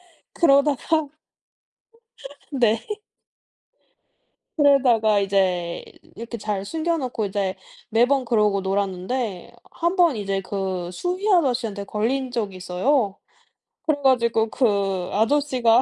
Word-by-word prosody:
네. - - -34
그러다가 295 0 +3 1.4
네. 230 -4 +1 1.7
그러다가 245 -8 +4
이제 185 -3 0 0.3
이렇게 235 +1 -7
잘 205 -2 -3
숨겨 325 +8 -1
놓고 245 -6 -3
이제 195 -1 -2 0.3
매번 250 +4 +3
그러고 210 -4 +2
놀았는데 195 +2 -2 0.2
1 340 +3 -1
번 340 -7 +4
이제 195 -1 -2
그 185 -2 -3
수의 365 - -2
아저씨한테 245 - +1
걸린 250 +5 -1
적이 210 -6 -3
있어요. 200 +4 0 0.7
그래 310 -3 +2
가지고 235 -4 +3
그 200 -7 0
아저씨가 245 0 +3
225 Hz, 225 characters per minute, -23 LUFS, 195-275 Hz, 1.7 s, 그러다가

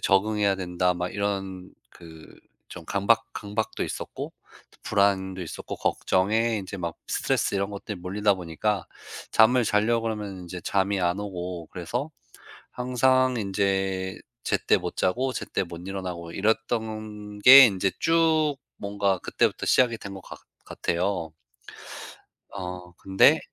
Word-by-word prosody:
적응해야 100 0 +2
된다.' 90 -1 0
막 90 0 -3
이런 95 -2 -3 0.2
그 80 -2 -14 0.3
좀 90 -2 -10
강박 100 +5 +2
강박도 105 +1 -3
있었고 - - -6 0.5
불안도 95 -2 +1
있었고 80 - -7
걱정에 110 +4 +1
이제 95 +1 -7
막 85 -3 -4
스트레스 - - 0
이런 100 +1 -1
것들이 100 0 -6
몰리다 100 +3 +1
보니까 90 +3 -2 0.5
잠을 120 +2 +5
자려고 110 +2 +2
그러면 105 -4 -4
인제 90 0 -7
잠이 100 +1 0
안 90 +1 +1
오고 90 -4 -5
그래서 120 - -4 0.6
항상 130 +1 +2
인제 95 -2 -1 0.3
제때 - - +2
못 - - -5
자고 130 +8 0
제때 - - -2
못 85 -1 -9
일어나고 90 -3 -5
이랬던 110 0 -2
게 135 +5 +11
인제 95 -2 0
쭉 160 -3 +3 0.2
뭔가 100 -2 -1
그때부터 - - 0
시작이 120 -3 +4
된 100 -1 -8
것 95 - -9
같 - - -11 0.3
같아요. 85 -2 -2 1.2
어 90 -2 -7
근데 95 0 +4
100 Hz, 270 characters per minute, -26 LUFS, 90-110 Hz, 1.2 s, 게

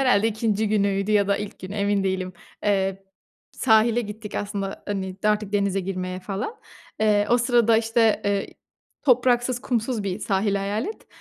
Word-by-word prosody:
herhâlde 225 -5 +4
2'inci 220 -1 0
günüydü 200 -1 +1
ya 200 -1 +3
da 200 - +3
ilk 210 0 -6
gün, 185 - -8
emin 200 -1 0
değilim, 185 -1 -1 0.3
eee, 195 -1 0 0.5
sahile 230 0 +3
gittik 210 -1 -7
aslında, 200 -1 -4
hani, 190 -2 -3
artık 210 -1 +1
denize 200 -1 +1
girmeye 185 -1 -4
falan. 200 - -4 0.5
Eee, 210 -1 +3
o 240 - +5
sırada 235 -2 +4
işte, 225 -1 +2
ııı, 200 -1 +1 0.6
topraksız, 245 -2 +3
kumsuz 235 -2 -1
bir 195 -1 -3
sahil 200 -1 0
hayal 200 +3 -1
et. 435 - -8
205 Hz, 155 wpm, -24 LUFS, 195-225 Hz, 0.6 s, o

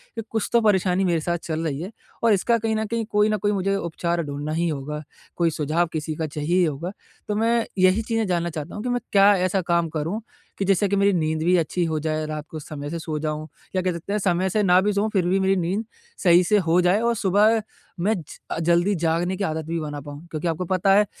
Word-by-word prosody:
कि - - -3
कुछ 220 -1 -1
तो 235 - +5
परेशानी 190 -3 +2
मेरे 170 -3 +1
साथ 170 +2 -1
चल 160 0 -3
रही 145 -1 -3
है, 185 +5 -6 0.3
और 230 -2 +5
इसका 230 +4 +2
कहीं 225 0 -1
न 220 0 -1
कहीं 230 +1 -2
कोई 210 +1 +3
न 215 - +1
कोई 205 +1 0
मुझे 195 0 0
उपचार 170 -1 -2
ढूँढना 145 +1 -4
ही 170 +2 0
होगा, 150 0 -4 0.4
कोई 170 -1 +3
सुझाव 160 +3 +1
किसी 155 0 -3
का 160 0 -2
चाहिए 150 +4 -1
ही 185 - +4
होगा। 160 +4 -3 0.4
तो 210 - 0
मैं 230 +1 +2
यही 185 +3 +4
चीज़ें 225 0 0
जानना 175 -2 0
चाहता 155 -1 -6
हूँ 210 - -5
कि 250 - -2
मैं 245 0 +1
क्या 200 0 +6
ऐसा 185 +1 +1
काम 170 -1 +2
करूँ 160 +8 -3 0.4
कि 195 - 0
जिससे 195 +1 +3
कि 200 - +1
मेरी 200 0 +3
नींद 155 -2 0
भी 180 +2 +4
अच्छी 175 +2 0
हो 160 -1 -1
जाए, 155 0 -2
रात 155 -1 -5
को 155 - -6
समय 145 -1 -7
से 165 +2 -4
सो 160 -1 -4
जाऊँ, 155 0 -3 0.3
या 185 - +2
कह 185 0 0
सकते 170 +4 -5
हैं 210 - +1
समय 185 -1 +1
से 210 +3 +1
ना 180 -1 +5
भी 205 +2 +1
सोऊँ, 205 +2 +1
फिर 190 -4 +2
भी 185 +2 +2
मेरी 190 0 +2
नींद 190 +5 -1 0.4
सही 175 -1 +6
से 210 +4 +3
हो 175 -2 +2
जाए। 180 +3 +3
और 235 0 +1
सुबह 210 +3 +3 0.4
मैं 205 +6 +2
ज 175 - -6 0.3
अ, - - -2
जल्दी 175 +4 +2
जागने 170 +2 0
की 200 - -2
आदत 160 -3 -2
भी 165 +1 -2
बना 145 -2 -5
पाऊँ, 145 +3 -10
क्योंकि 155 +2 -3
आपको 165 +3 -2
पता 185 +2 +2
है 210 +1 +5
180 Hz, 255 wpm, -23 LUFS, 160-200 Hz, 0.4 s, क्या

